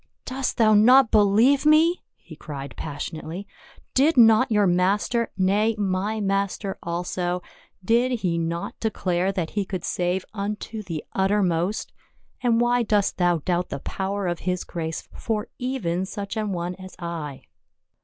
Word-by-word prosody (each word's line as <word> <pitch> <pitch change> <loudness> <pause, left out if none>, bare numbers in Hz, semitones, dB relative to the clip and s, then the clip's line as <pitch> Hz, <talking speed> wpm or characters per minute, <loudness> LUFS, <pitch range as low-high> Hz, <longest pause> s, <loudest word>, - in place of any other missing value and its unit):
" - - -53
Dost 265 0 -2
thou 220 -2 +5
not 240 +4 +6
believe 220 +6 +4
me 315 +3 +4
?" - - -58
he - - -14
cried 140 -3 -8
passionately. 160 +5 -6 0.3
" - - -27
Did 305 +1 +3
not 225 +1 +6
your 210 -2 +4
Master 195 +6 +1
— - - -44
nay, 215 +2 +2
my 200 +2 -1
Master 195 -1 -1
also 175 +1 -2 0.2
— 190 - -27
did 240 +2 +2
he 170 -3 0
not 170 +1 -3
declare 185 -4 0
that 180 -5 -3
he 205 - -1
could 185 -1 -5
save 180 +1 -1
unto 210 +1 -4
the 170 -6 -6
uttermost? 190 -1 0 0.5
And 235 -2 +2
why 240 +1 +3
dost 210 -3 +1
thou 175 -4 +2
doubt 180 -1 0
the - - -4
power 195 +7 -3
of 175 -1 -1
his 180 -1 -2
grace 160 -1 -5
for 215 -1 -3
even 190 -9 -2
such 200 0 -5
an 215 -2 -2
one 175 -1 -3
as 185 0 -11
I." 165 -5 -6
195 Hz, 165 wpm, -24 LUFS, 175-220 Hz, 0.5 s, not